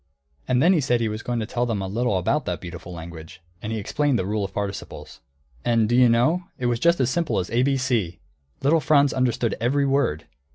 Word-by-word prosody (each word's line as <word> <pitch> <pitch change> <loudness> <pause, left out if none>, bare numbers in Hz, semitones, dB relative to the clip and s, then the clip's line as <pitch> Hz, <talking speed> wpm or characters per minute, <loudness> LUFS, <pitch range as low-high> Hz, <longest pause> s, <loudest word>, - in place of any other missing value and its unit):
And 125 +1 +2
then 180 +3 +5
he 165 - +2
said 125 -2 +1
he 115 - 0
was 110 +1 -5
going 120 -1 -2
to - - -2
tell 120 +2 -2
them 110 -4 -1
a 95 - -3
little 115 +1 0
about 140 +12 0
that 90 -3 -3
beautiful 85 +1 -9
language, 80 -2 -9 0.2
and 110 - -5
he 110 - -2
explained 140 +6 0
the 95 - -2
rule 105 +1 -1
of 95 - -4
participles. 100 0 -6 0.4
And 115 -2 +2
do 120 - +1
you 125 -1 +6
know, 130 +10 +2
it 125 - -4
was 120 -1 +1
just 170 +5 +3
as 130 -1 +1
simple 170 +2 0
as 90 - -2
ABC! 125 -7 0 0.5
Little 155 +4 +4
Franz 145 -2 +3
understood 120 -3 0
every 140 +4 +2
word. 135 - 0
120 Hz, 220 wpm, -23 LUFS, 100-135 Hz, 0.5 s, you